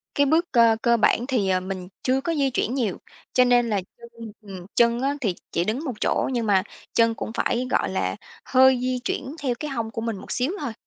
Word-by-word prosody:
Cái 285 - +4
bước 320 +5 +2
cơ 230 -2 +5
cơ 235 0 +3
bản 230 +1 +2
thì, 235 -8 0
ờ, 185 -1 +2
mình 185 -1 -6 0.2
chưa 265 +1 +1
có 335 - -1
di 280 -2 +2
chuyển 250 -2 -1
nhiều, 230 -9 -1 0.4
cho 250 - +5
nên 245 -1 +3
là 205 -3 0 0.2
chân 230 -1 -11
ừm, 190 -4 -9
chân 235 0 +3
á 275 +2 0
thì 200 -8 0 0.2
chỉ 170 - +1
đứng 230 - -2
một 260 - -2
chỗ, - - +1
nhưng 235 -2 -1
mà 195 -3 +3 0.3
chân 230 -1 +3
cũng 220 - -5
phải, 250 +1 0
gọi - - +1
là, 95 - -1 0.3
hơi 260 -1 +5
di 255 0 -1
chuyển 270 +3 -4
theo 250 -3 0
cái 300 -1 -4
hông 230 -4 -3
của 225 - -4
mình 225 -2 -3
một - - -10
xíu 255 +6 0
thôi. 235 - -4
235 Hz, 235 wpm, -24 LUFS, 215-260 Hz, 0.4 s, cơ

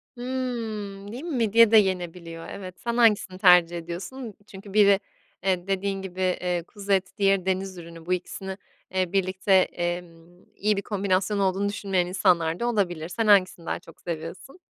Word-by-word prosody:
Hımm. 225 -6 -4
Değil 250 +6 -7
mi? 335 -4 -3
Midye 230 0 +5
de 225 - +8
yenebiliyor. 175 -4 -1
Evet, 185 -2 -8
sen 235 0 -2
hangisini 210 -5 +3
tercih 180 -2 +6
ediyorsun? 195 +9 -7
Çünkü 195 0 -11
biri, 200 -2 +6 0.4
eee, 185 -1 0
dediğin 195 0 -1
gibi, 190 -1 -6
eee, 180 -1 0
kuzu 200 -1 -7
eti, 195 +1 +1
diğeri 195 -2 +2
deniz 190 0 -2
ürünü, 165 -1 -11
bu 180 - 0
ikisini, 190 +1 -5 0.4
eee, 185 -2 0
birlikte, 190 0 +1
emm, 175 -1 -1
iyi 210 0 +1
bir 200 - 0
kombinasyon 200 0 0
olduğunu 195 +1 +1
düşünmeyen 195 -4 -1
insanlar 175 -3 +2
da 240 - 0
olabilir. 175 -8 -1
Sen 220 +5 -1
hangisini 185 -4 +4
daha - - -2
çok - - -17
seviyorsun? 170 - -7
190 Hz, 165 wpm, -25 LUFS, 180-205 Hz, 0.4 s, de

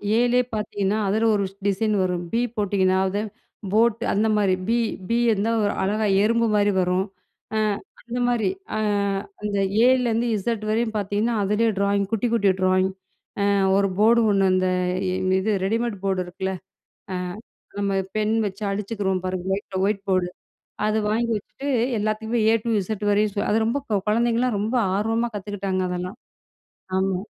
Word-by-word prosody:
ஏ - - +4
லே 250 - +4 0.2
பாத்தீங்கன்னா, 205 -1 -1
அதுல 220 +3 +2
ஒரு 200 -1 0 0.2
டிசைன் 210 +2 +1
வரும். 180 -1 -1
பி 230 - +1 0.2
போட்டீங்கன்னா, 190 -2 +2
அது 205 +2 -1 0.5
போட், 230 0 +4 0.2
அந்த 215 +2 +2
மாரி, 195 -3 +3
பி, 235 +1 +2 0.3
பி 230 - +2
வந்து 210 +2 0
ஒரு 205 - +2
அழகா 210 +3 0 0.2
எறும்பு 230 +1 +2
மாரி 205 0 +3
வரும். 180 +1 +1 0.5
அ, - - +1 0.4
அந்த 245 +1 -5
மாரி, 225 -6 +1 0.3
அ, - - 0 0.6
அந்த 205 -1 -2 0.3
ஏ 245 - +6
ல - - -1
இருந்து 230 +2 0
இஸட் 215 +1 -2
வரையும் 220 0 0
பாத்தீங்கன்னா, 205 +3 0
அதுலே 210 +3 +2
டிராயிங், 200 0 +1
குட்டி 225 +2 +1
குட்டி 200 -4 +4
டிராயிங். 185 0 +3 0.6
அ, - - +3 0.3
ஒரு 195 -1 +2
போர்டு 230 +2 +5
ஒன்னு 195 -1 +3
இந்த, 185 0 +2 0.7
இது 215 +3 0
ரெடிமேட் 225 0 -1
போர்டு 190 -1 +1
இருக்குல்ல? 190 +1 -4 0.6
அ, - - -2 0.6
நம்ம 200 -1 0 0.2
பென் 215 +1 +1
வச்சு 195 +2 -7
அழிச்சுக்குறோம் 195 -2 -2
பாருங்க! 185 -1 -3
வீட்ல 195 -1 -4
ஒயிட் 200 -1 -1
போர்டு, 185 -1 +2 0.6
அத 215 0 +1
வாங்கி 230 +2 0
வச்சிட்டு, 275 +7 -8 0.3
எல்லாத்துக்குமே 220 +2 -1
ஏ 225 - +4
டு 235 - -1
இஸட் 210 +2 -4
வரையும் 205 0 +1
அது 215 - +3
ரொம்ப 235 +5 0 0.3
கொழந்தைகலாம் 235 +1 +2
ரொம்ப 220 +4 -2 0.2
ஆர்வமா 225 +3 0
கத்துக்கிட்டாங்க 195 -2 -3
அதெல்லாம். 180 +2 -4 0.8
ஆமா. 190 -1 +1
205 Hz, 155 wpm, -23 LUFS, 195-225 Hz, 0.8 s, ஏ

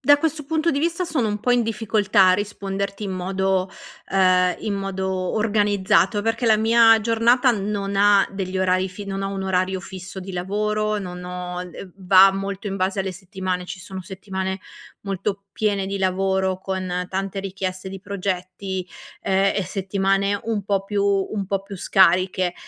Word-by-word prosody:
da 290 0 +5
questo 310 -1 -1
punto 320 +3 +1
di 280 - 0
vista 335 +4 0
sono 300 -10 0
un 210 0 -3
po' 245 - 0
in 245 -1 +4
difficoltà 215 -3 +2
a - - +6
risponderti 200 0 -4
in 195 - -3
modo 190 0 0 0.4
ehm, 185 -1 +3
in 210 -2 -2
modo 195 -1 -3 0.3
organizzato, 205 -2 +2
perché 225 +2 0
la 220 -1 +6
mia 225 0 +5
giornata 235 +3 +3
non 200 -2 -2
ha 200 0 +5
degli 190 -1 -3
orari 185 0 +2
fi 190 +3 -9
non 195 0 -4
ha - - -1
un 195 -1 -4
orario 185 0 0
fisso 185 +1 -8
di 190 +1 -8
lavoro, 210 +3 -1
non 180 -2 -7
ho 180 0 -5
le 180 +1 -10
va 190 0 +6
molto 195 +1 -4
in 195 -1 -3
base 190 +1 0
alle 190 -1 -3
settimane. 185 -1 -4
Ci 185 +1 -8
sono 190 +1 -7
settimane 190 0 -4 0.4
molto 195 0 -3
piene 200 -3 0
di 195 - -3
lavoro, 190 0 0
con 185 -1 -3
tante 195 +1 -3
richieste 190 -1 -4
di 190 0 -8
progetti, 190 -1 -4 0.4
ehm, 195 +1 +2
e 200 - +1
settimane 195 +1 0
un 220 -3 -1
po' 195 -1 0
più 200 0 -1
un 200 0 0
po' 195 0 -1
più 195 0 -9
scariche. 185 0 +3
195 Hz, 170 wpm, -22 LUFS, 185-205 Hz, 0.4 s, a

